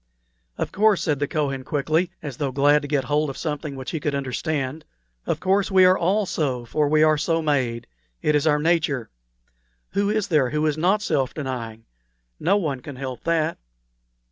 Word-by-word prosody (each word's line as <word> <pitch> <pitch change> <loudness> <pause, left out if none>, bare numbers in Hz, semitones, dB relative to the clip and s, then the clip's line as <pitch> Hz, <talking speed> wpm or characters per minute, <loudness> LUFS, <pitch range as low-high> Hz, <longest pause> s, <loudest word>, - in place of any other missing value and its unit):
"Of - - -3
course," 210 -1 +3
said 150 -4 0
the 145 - 0
Kohen, 135 -4 -2
quickly, 155 +5 0
as 140 -5 -6
though 140 -3 -1
glad 145 +2 +4
to 145 - -6
get 145 -2 0
hold 145 +3 0
of 135 - -7
something 150 -2 -4
which 130 -1 -6
he 160 - -2
could 145 -1 -1
understand, 140 +2 -2 0.4
"of - - 0
course 195 +1 +1
we 190 -1 +6
are 185 0 +6
all 195 +4 +1
so, 130 -9 -2
for 150 +4 0
we 155 +1 +4
are 155 -1 +4
so 165 +1 +1
made. 130 -6 0 0.4
It 150 - +3
is 150 +1 +2
our 150 -1 +4
nature. 150 - 0 0.8
Who 200 0 +1
is 210 -1 0
there 150 -7 +3
who 150 +3 0
is 155 -2 +1
not 190 +7 +2
self 140 -9 0
denying? 120 -6 -5 0.5
No 190 +6 +3
one 150 -9 -2
can 135 +2 -9
help 130 -1 -6
that." 165 -1 0
150 Hz, 195 wpm, -23 LUFS, 135-165 Hz, 0.8 s, we